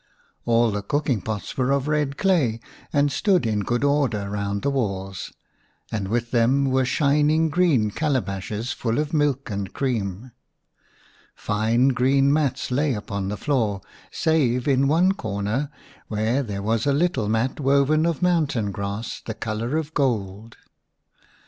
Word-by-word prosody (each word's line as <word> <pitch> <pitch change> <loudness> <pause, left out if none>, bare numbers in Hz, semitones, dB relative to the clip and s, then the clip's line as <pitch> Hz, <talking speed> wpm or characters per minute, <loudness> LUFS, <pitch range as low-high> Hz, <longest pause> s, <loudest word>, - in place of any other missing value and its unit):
All 115 -1 +3
the 105 0 -2
cooking 135 0 -1
pots 105 +1 -5
were 130 -1 0
of 140 0 +1
red 150 -2 0
clay, 160 - +2 0.3
and 145 0 +2
stood 185 - +2
in 110 -2 0
good 120 +5 -1
order 130 -9 +1
round 100 0 -2
the 140 - +1
walls, 95 -8 -3 0.6
and 100 -3 -2
with 120 +3 -1
them 125 +3 +3
were 130 0 +2
shining 150 +4 +2
green 150 -11 +2
calabashes 110 -4 -2
full 115 -4 -2
of 150 +1 -1
milk 145 -5 0
and 100 -2 -4
creams 115 -3 -2 1.0
Fine 115 +5 +1
green 135 +2 +3
mats 140 -3 0
lay 140 -1 +1
on 100 -2 -2
the 105 +1 -3
floor, 110 -6 0 0.3
save 130 -6 +1
in 135 -1 +3
one 170 +6 +4
corner 110 - -2 0.4
where 110 +5 0
there 100 -6 -5
was 115 +4 0
a 140 - +3
little 145 -8 +1
mat 115 +6 0
woven 140 +3 +3
of 170 +1 -2
mountain 150 - +1
grass 100 +3 -5
the 110 - -5
colour 115 +5 -2
of 155 -1 -4
gold. 110 -5 -2
125 Hz, 150 wpm, -23 LUFS, 105-145 Hz, 1.0 s, one